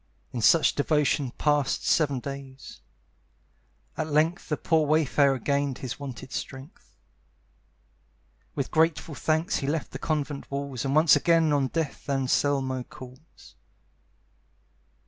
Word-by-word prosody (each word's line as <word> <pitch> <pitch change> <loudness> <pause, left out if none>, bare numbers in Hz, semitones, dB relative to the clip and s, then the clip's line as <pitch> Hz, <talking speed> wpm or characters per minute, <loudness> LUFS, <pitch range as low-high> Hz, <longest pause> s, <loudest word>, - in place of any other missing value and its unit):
In 120 - -3
such 160 +8 +5
devotion 145 -2 +1
passed 145 -3 +1
seven 145 -5 +2
days. 135 0 -9 1.1
At 155 0 -2
length 160 +4 +1
The 150 - 0
poor 160 -2 +1
wayfarer 140 -2 +3
gained 140 +1 -1
his 130 0 -6
wonted 130 -2 -8
strength. 135 +5 -8 1.6
With - - -3
grateful 160 0 +1
thanks 160 +5 0
he 135 - -3
left 155 +1 -2
the 135 - -7
convent 145 -3 -3
walls, 140 -3 -4
And 135 +1 0
once 155 -1 +6
again 165 -3 +3
on 140 -2 +2
death 155 -1 -4
Anselmo 135 -1 0
calls. 130 0 -14
145 Hz, 120 wpm, -26 LUFS, 135-155 Hz, 1.6 s, once